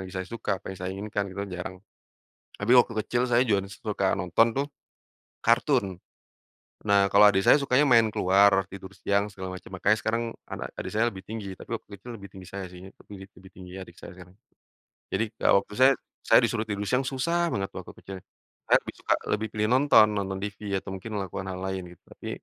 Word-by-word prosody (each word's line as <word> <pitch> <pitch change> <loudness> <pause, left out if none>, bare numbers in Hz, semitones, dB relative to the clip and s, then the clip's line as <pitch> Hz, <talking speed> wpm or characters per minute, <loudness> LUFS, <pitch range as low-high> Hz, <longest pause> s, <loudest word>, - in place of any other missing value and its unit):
lagi 95 - -12
saya 95 - -2
suka, 105 -4 -2
apa - - -8
yang 95 - -11
saya 95 0 -3
inginkan 100 0 -3
gitu 95 - -10
kan 100 - -10
jarang. 90 +1 -6 0.8
Tapi 100 +4 -1
waktu 115 - +2
kecil 125 +1 0
saya 120 +1 +4
juga 100 -5 0
suka 100 0 -1
nonton 95 +4 +3
tuh 140 +1 0 0.8
kartun. 115 - +2 0.9
Nah, 100 -1 +4
kalo 105 +1 +7
adik 95 0 0
saya - - +9
sukanya 140 0 +3
main 115 -3 +5
keluar, 95 0 +4
tidur 95 0 -10
siang 100 +1 -1
segala 95 -2 -6
macam, 90 - -12
makanya 105 +2 +3
sekarang 115 +1 0 0.3
anak - - -4
adik - - -5
saya 110 +2 +2
lebih 95 -5 -6
tinggi, 100 -2 -6
tapi - - -13
waktu 100 - -13
itu 100 - -17
lebih 100 -4 -9
tinggi 95 0 -12
saya 95 -1 -5
sih, 90 0 -12
tapi 95 -1 -13
di - - -9
lebih 95 0 -16
tinggi 90 0 -11
adik 85 -2 -11
saya - - -11
sekarang. 90 0 -14 0.8
Jadi 115 - +1
kalau 100 - +4
waktu 105 - -14
saya 130 +1 +7 0.3
saya - - +6
disuruh 110 - 0
tidur 105 -1 -3
siang 125 +1 +1
susah 165 +6 0
banget 95 -1 -1
waktu - - -7
kecil. 95 - -9 0.5
Saya - - +6
lebih - - -9
suka - - +1 0.2
lebih 110 +1 -4
pilih 105 0 0
nonton, 130 -5 +6
nonton 95 -1 -2
TV 100 0 -6 0.2
atau - - -9
mungkin 95 +4 -8
melakukan 95 0 -5
hal 90 - -6
lain 95 -1 -3
gitu, - - -56
tapi, - - -9
100 Hz, 210 wpm, -27 LUFS, 95-115 Hz, 0.9 s, saya